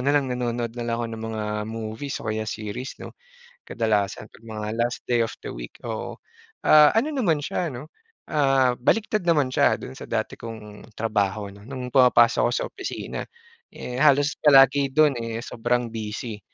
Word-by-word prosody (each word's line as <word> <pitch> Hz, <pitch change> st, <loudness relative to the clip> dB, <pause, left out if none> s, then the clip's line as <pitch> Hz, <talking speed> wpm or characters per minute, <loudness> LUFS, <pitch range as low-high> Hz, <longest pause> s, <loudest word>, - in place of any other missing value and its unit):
na 140 Hz, -, +2 dB
lang, 140 Hz, -2 st, +2 dB
nanonood 120 Hz, -1 st, -2 dB
na 120 Hz, -, -4 dB
lang 115 Hz, 0 st, -1 dB
ako 120 Hz, -, -2 dB
ng 110 Hz, -, -7 dB
mga 110 Hz, -1 st, -3 dB, 0.2 s
movies 110 Hz, +4 st, -5 dB
o 110 Hz, -, -1 dB
kaya 110 Hz, 0 st, -2 dB
series 110 Hz, +4 st, -5 dB
'no. -, -, -8 dB, 0.6 s
Kadalasan, 105 Hz, -2 st, -1 dB
'pag 115 Hz, -, -18 dB
mga 105 Hz, -1 st, -5 dB
last 120 Hz, +1 st, 0 dB
day 120 Hz, -1 st, +3 dB
of -, -, -7 dB
the -, -, -5 dB
week, -, -, -8 dB
oo. -, -, -4 dB, 0.5 s
Ah, 150 Hz, -1 st, +7 dB
ano 245 Hz, +7 st, +2 dB
naman 175 Hz, -, +1 dB
siya 170 Hz, +4 st, -2 dB
'no, 130 Hz, +6 st, -8 dB, 0.4 s
ah, 135 Hz, -4 st, +3 dB
baliktad 215 Hz, -, +1 dB
naman 150 Hz, -6 st, +3 dB
siya -, -, +3 dB
do'n 65 Hz, -, -8 dB
sa -, -, -8 dB
dati -, -, -2 dB
kong 110 Hz, -2 st, -9 dB
trabaho 105 Hz, -2 st, -1 dB
'no, 100 Hz, +1 st, -15 dB
no'ng 130 Hz, -2 st, -5 dB
pumapasok 125 Hz, -3 st, +5 dB
ako -, -, -1 dB
sa -, -, -1 dB
opisina. 385 Hz, -, -5 dB, 0.5 s
Eh, 125 Hz, +1 st, -6 dB
halos 145 Hz, 0 st, +4 dB
palagi 140 Hz, -1 st, +6 dB
do'n, 150 Hz, +1 st, +4 dB
eh, 115 Hz, -1 st, -4 dB
sobrang 120 Hz, 0 st, -1 dB
busy. 110 Hz, 0 st, -5 dB
120 Hz, 180 wpm, -24 LUFS, 110-140 Hz, 0.6 s, Ah